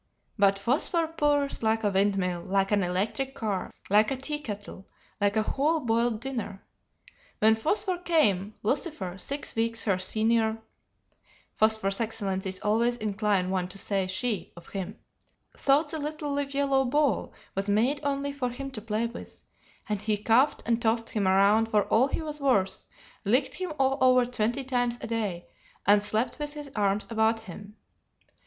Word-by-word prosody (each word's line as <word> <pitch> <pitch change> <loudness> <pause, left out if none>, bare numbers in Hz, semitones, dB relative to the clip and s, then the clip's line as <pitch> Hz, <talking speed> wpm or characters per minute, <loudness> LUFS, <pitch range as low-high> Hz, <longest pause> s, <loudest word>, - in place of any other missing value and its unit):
But 200 -2 +3
Phosphor 275 - +1
purrs 290 -3 +1
like 220 0 +1
a 205 - +2
windmill, 190 -3 +1
like 195 +2 0
an 205 -1 +3
electric 205 +9 -1
car, 210 -7 -2 0.2
like 210 +2 +4
a 270 - -2
tea 295 +3 -3
kettle, 205 -6 -7 0.3
like 205 +1 +2
a 215 - +3
whole 300 +8 +1
boiled 230 -3 0
dinner. 230 -7 -5 0.7
When 220 +1 +5
Phosphor 360 - 0
came, 215 - +1
Lucifer, 210 - -2
six 280 +6 -3
weeks 230 -1 0
her 195 -4 +1
senior 220 +3 +1 1.0
(Phosphor's 220 -2 +2
excellencies 195 -4 -2
always 235 +3 +1
incline 205 -4 0
one 185 -2 0
to 190 +2 -10
say 195 -1 -1
'she' 210 +3 -2
of 170 - -13
him), 195 0 -5 0.6
thought 290 +2 +2
the 315 - -3
little 300 0 -3
live 280 -1 -2
yellow 275 -1 +2
ball 270 -2 +1 0.2
was 195 +1 -2
made 240 +8 +2
only 280 -1 -1
for 260 -3 -2
him 270 +3 -6
to 220 - -6
play 220 +1 -1
with, 235 +1 -8 0.4
and 210 -2 -2
he 210 0 0
cuffed 230 +7 +2
and 230 0 +1
tossed 225 0 +1
him 205 -3 0
around 200 +4 +4
for 210 -2 +3
all 250 +4 +4
he 320 - -3
was 300 -1 -5
worth, 195 -9 +1 0.4
licked 250 +7 +2
him 370 -3 -4
all 270 +1 +2
over 255 -1 +5
twenty 240 +2 -1
times 245 -2 0
a - - -6
day, 210 -7 -3 0.4
and 205 +1 +5
slept 215 +7 -1
with 295 0 -3
his 295 -2 -8
arms 205 -1 +1
about 225 0 +2
him. 205 +1 -11
225 Hz, 165 wpm, -27 LUFS, 200-270 Hz, 1.0 s, When